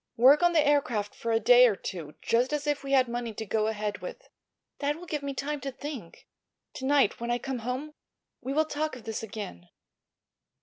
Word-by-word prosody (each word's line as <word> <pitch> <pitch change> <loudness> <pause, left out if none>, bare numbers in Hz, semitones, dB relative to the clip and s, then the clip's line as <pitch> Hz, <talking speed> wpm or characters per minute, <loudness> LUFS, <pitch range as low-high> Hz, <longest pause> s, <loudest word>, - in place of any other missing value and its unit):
"Work 265 +6 +7
on 350 0 +4
the 315 -3 +4
aircraft 240 -8 +1
for 230 - -3
a 225 - +3
day 245 +1 +7
or 215 - +1
two, 165 -5 -7
just 245 +4 +2
as 295 0 -1
if 290 -1 0
we 275 0 -2
had 260 -2 +5
money 235 -2 -4
to 220 - -4
go 215 +1 0
ahead 210 -1 -2
with. - - -9 0.5
That 290 0 0
will 345 +3 -10
give 300 -4 -3
me 280 -1 -4
time 290 +1 -3
to 275 +1 -4
think. 265 - -8 0.5
To 265 - -6
night, 280 -5 +3
when 235 0 -4
I 240 - +2
come 265 0 -4
home, 255 +6 -4 0.5
we 265 - -4
will 310 +3 +2
talk 305 -1 -2
of 245 - -11
this 225 -1 -4
again." 200 - -7
255 Hz, 215 wpm, -28 LUFS, 225-290 Hz, 0.5 s, Work